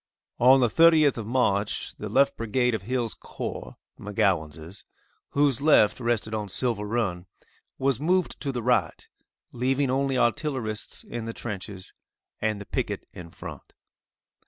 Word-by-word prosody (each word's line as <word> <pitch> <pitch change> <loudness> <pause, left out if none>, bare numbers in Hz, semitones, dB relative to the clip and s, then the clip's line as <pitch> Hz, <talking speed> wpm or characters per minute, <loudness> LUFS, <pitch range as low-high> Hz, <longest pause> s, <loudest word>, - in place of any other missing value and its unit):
On 130 +2 +6
the 120 - +5
30th 155 +1 +5
of 110 - -6
March, 105 -5 0
the 105 - -6
left 140 +6 +3
brigade 125 +2 0
of 110 - -2
Hill's 120 +2 -2
corps, - - -7 0.2
(McGowan's,) 85 -3 -1 0.5
whose 140 -3 +2
left 140 -9 +4
rested 115 -3 -1
on 105 -2 -3
Silver 115 0 0
run, 100 -5 -2 0.5
was 135 -3 +1
moved 180 +4 +1
to 140 - -2
the 120 -3 -4
right, 120 -9 0 0.4
leaving 130 +2 0
only 135 0 +1
artillerists 120 -3 -1
in 120 -1 -6
the 115 - -5
trenches, 100 -4 -7 0.5
and 110 -1 0
the 100 - -8
picket - - -3
in 85 -2 -9
front. - - -10
120 Hz, 140 wpm, -26 LUFS, 105-130 Hz, 0.5 s, On